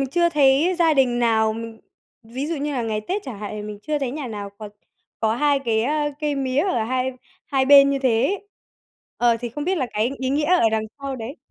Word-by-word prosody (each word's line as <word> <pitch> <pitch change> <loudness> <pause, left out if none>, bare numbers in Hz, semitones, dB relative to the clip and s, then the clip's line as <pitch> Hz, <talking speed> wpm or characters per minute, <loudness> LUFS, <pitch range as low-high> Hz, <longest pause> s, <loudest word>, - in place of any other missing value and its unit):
mình 270 - -1
chưa 345 +1 +3
thấy 295 +3 +3
gia 325 -3 +4
đình 250 -3 +2
nào 220 -2 +2
mình 225 0 -8 0.4
ví 255 +6 -5
dụ 330 -1 -2
như 290 +1 -3
là 250 -3 -1
ngày 220 -1 -2
Tết 380 - -3
chẳng 240 -7 -7
hạn 210 - -6
thì 210 - -5
mình 210 -1 -7
chưa 300 -1 -1
thấy 265 -3 -2
nhà 285 -1 -5
nào 205 -3 -6
có 210 -1 -7 0.5
có 220 0 +1
2 290 +1 +2
cái, 220 -1 +1
a, 295 +3 0
cây 295 -1 0
mía 265 0 0
ở 245 - 0
hai 255 +2 -1 0.3
hai 270 -2 +1
bên 280 0 +7
như 275 - 0
thế 240 -3 +2
ấy. 400 +5 -2 0.7
Ờ, 240 -1 +3
thì 240 - -3
không 290 +6 -5
biết 370 +1 0
là 260 - 0
cái 220 +4 0
ý 260 0 -2
nghĩa 295 +2 +1
ở 345 -8 +4
đằng 220 0 0 0.2
sau 275 -1 -5
đấy. 235 +6 -7
265 Hz, 245 wpm, -22 LUFS, 225-295 Hz, 0.7 s, bên